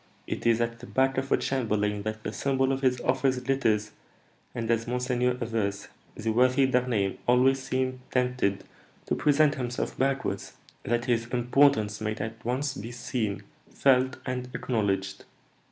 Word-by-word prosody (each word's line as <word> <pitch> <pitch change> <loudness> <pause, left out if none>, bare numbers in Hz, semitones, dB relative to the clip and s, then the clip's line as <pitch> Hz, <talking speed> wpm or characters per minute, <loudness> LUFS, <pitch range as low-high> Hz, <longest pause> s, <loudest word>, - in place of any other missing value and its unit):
it - - -3
is 115 -1 +4
at 115 0 -1
the 125 - -10
back 135 0 +2
of 135 +1 -5
a - - +5
chamberlain 105 -5 0
that 110 +1 -5
the 105 - -4
symbol 135 0 +1
of 135 0 -1
his 130 -2 +2
office 130 0 +1
glitters, 120 -5 0 0.6
and, 115 -1 -1
as 115 0 0
monseigneur 125 0 0
avers, 105 -4 -2 0.3
the 110 0 -2
worthy 130 +3 +4
D'Harneim 125 -7 0
always 130 +2 +4
seems 130 0 -2
tempted 125 -6 0 0.4
to - - -1
present 150 0 +3
himself 125 -3 -3
backwards, 135 -7 -1 0.3
that 120 +2 -1
his 115 -1 0
importance 120 -3 +2
may 110 0 -1
at 110 +2 -6
once 130 +4 -1
be 115 -3 -7
seen, 120 -4 -3 0.3
felt, 130 -1 +2
and 125 -1 -3
acknowledged." 95 -5 -1
125 Hz, 155 wpm, -27 LUFS, 110-130 Hz, 0.6 s, a